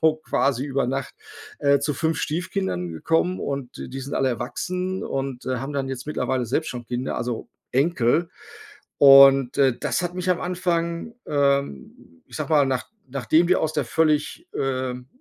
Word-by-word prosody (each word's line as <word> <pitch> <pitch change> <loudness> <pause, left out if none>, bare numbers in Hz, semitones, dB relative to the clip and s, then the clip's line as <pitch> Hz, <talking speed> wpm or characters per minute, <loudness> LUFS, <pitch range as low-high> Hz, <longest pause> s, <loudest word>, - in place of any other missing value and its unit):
so 160 -1 +4
quasi 140 -4 0
über 140 -2 -1
Nacht, 135 0 -3 0.5
äh, 140 -1 +4
zu 150 0 -1
5 160 +4 -1
Stiefkindern 170 - -2
gekommen 165 - 0
und 140 -3 -4
d - - -6
die 135 +2 -6
sind 135 +2 -6
alle 135 - +1
erwachsen 180 - -3
und, 135 -2 -4
äh, 130 -1 0
haben 135 +4 -5
dann 135 -1 -2
jetzt 130 0 -6
mittlerweile 130 -3 -1
selbst 155 +7 -1
schon 120 -2 -7
Kinder, 125 +2 -3
also 120 -1 -4 0.2
Enkel. 140 +3 +2 0.7
Und, 135 -2 +7
äh, 130 -3 +3
das - - -1
hat 175 0 -3
mich 185 0 -3
am 180 - +1
Anfang, 175 +2 -2
ähm, 140 - -1
ich - - -15
sage 155 0 -4
mal, 145 -3 +4
nach 130 -2 -2 0.2
nachdem 140 +6 +2
die 185 - +5
aus 155 -1 -1
der 150 - 0
völlig, 160 - 0
ähm, 130 -2 -2
140 Hz, 175 wpm, -23 LUFS, 130-165 Hz, 0.7 s, Und